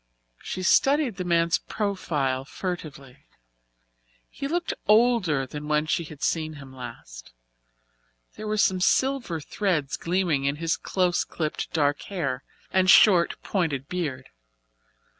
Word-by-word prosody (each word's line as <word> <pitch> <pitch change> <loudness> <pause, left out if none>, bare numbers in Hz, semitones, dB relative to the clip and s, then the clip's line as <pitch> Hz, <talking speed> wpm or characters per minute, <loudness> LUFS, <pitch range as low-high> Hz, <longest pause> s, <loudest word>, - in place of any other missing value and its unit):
She 185 - -5
studied 270 - +3
the 180 - -2
man's 170 -1 +2
profile 150 -11 -2
furtively. 145 -5 -7 1.0
He 275 - -5
looked 345 +3 -1
older 210 - +3
than 150 +3 -7
when 150 0 +1
she 165 +2 0
had 155 -2 -10
seen 155 -1 0
him 135 -3 -12
last - - -10 1.0
there 215 - -7
were 215 0 -1
some 190 -2 +2
silver 260 -5 +1
threads 155 -3 -1
gleaming 170 -6 0
in 140 +1 +1
his 165 +2 0
close 180 -2 0
clipped 155 -2 -4
dark 145 -2 +1
hair 140 -9 -3 0.3
and 185 0 +3
short, 190 -3 +6
pointed 150 -8 -1
beard. 145 -8 -4
165 Hz, 125 wpm, -25 LUFS, 145-190 Hz, 1.0 s, short